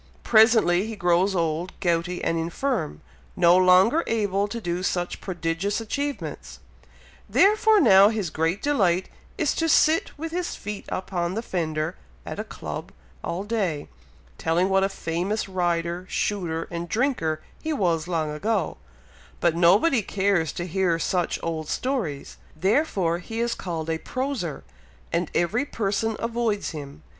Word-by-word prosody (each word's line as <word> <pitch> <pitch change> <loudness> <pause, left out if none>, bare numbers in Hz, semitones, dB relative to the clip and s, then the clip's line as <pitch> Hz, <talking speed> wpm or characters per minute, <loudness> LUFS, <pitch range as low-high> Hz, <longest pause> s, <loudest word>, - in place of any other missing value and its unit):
Presently 220 -4 +5
he 225 - -5
grows 185 +1 +2
old, 165 +1 -2
gouty, 175 -1 0
and 165 - +1
infirm 165 - -2 0.3
no 170 +1 +5
longer 185 - +5
able 205 -3 0
to 235 +3 -5
do 175 -3 -2
such 175 -1 -2
prodigious 175 +3 -2
achievements; 280 +6 -4 0.7
therefore 430 +1 +5
now 200 - +7
his 210 -7 -2
great 165 +5 -1
delight 190 -11 +2 0.3
is, - - +1
to 325 0 0
sit 315 +1 +3
with 320 +2 -5
his 350 +1 -2
feet 205 0 -6
upon 185 -1 -2
the 225 - -2
fender, 160 -4 -2 0.3
at - - -6
a - - -1
club - - -7 0.3
all 180 +3 -3
day, 200 -9 -2 0.5
telling 170 +4 +1
what 195 0 +3
a 195 - +2
famous 190 +3 -2
rider, 175 -1 -1
shooter, 170 -6 -1
and 170 0 -4
drinker, 220 - 0 0.2
he 315 - -2
was 170 - 0
long 160 -4 -1
ago; 195 +3 -1 0.6
but 170 -2 +2
nobody 205 - +4
cares 190 -5 +1
to 175 - -4
hear 180 -1 +1
such 175 +1 0
old 160 -2 -3
stories; 220 - -3 0.2
therefore 190 - +1
he 225 +5 -6
is 235 0 +1
called 165 -6 -4
a 160 0 -1
'proser,' 255 - -3 0.5
and 170 -1 0
every 175 +10 +1
person 220 -3 -1
avoids 230 -3 -1
him. 145 -1 -9
185 Hz, 145 wpm, -25 LUFS, 170-225 Hz, 0.7 s, now